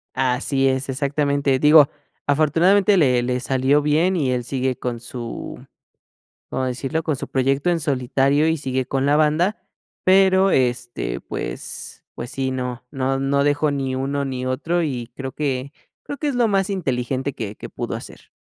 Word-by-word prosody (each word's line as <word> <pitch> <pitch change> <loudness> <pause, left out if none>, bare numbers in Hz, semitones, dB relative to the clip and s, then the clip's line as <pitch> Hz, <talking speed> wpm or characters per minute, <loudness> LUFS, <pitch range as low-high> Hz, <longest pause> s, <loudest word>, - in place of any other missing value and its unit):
Así 135 +1 +1
es, 130 +1 -1
exactamente. 140 0 +1
Digo, 150 0 +7 0.4
afortunadamente 170 +8 +4
le 125 -7 +3
le 125 +1 -1
salió 135 +3 +2
bien 155 +6 +2
y 135 -6 +1
él 125 -1 -1
sigue 130 +1 -1
con 120 -2 -4
su, 120 -1 -7 0.9
¿cómo 130 - -1
decirlo? 130 +5 -2
Con 155 - 0
su - - -6
proyecto 135 +5 +1
en 170 - +1
solitario 140 +1 +1
y 160 - +2
sigue 130 -3 -2
con 135 +1 -1
la 145 +1 +4
banda, 155 +7 +2 0.5
pero, 190 0 +5
este, 120 - -1
pues - - -6 0.2
pues 120 +1 -6
sí, 135 -1 -1
no, 125 -2 -4
no 135 -1 -1
no 140 +1 +1
dejó 145 +1 +2
ni 135 -2 -2
uno 140 +2 -1
ni 130 -2 -4
otro 155 +7 -1
y 125 -7 -3
creo 135 0 -5
que 140 -1 -3 0.3
creo 285 - -7
que 300 - -3
es 285 - 0
lo 240 -2 +2
más 195 -1 +1
inteligente 135 - -2
que 105 -4 -5
que - - -9
pudo - - -5
hacer. - - -10
135 Hz, 170 wpm, -22 LUFS, 130-155 Hz, 0.9 s, Digo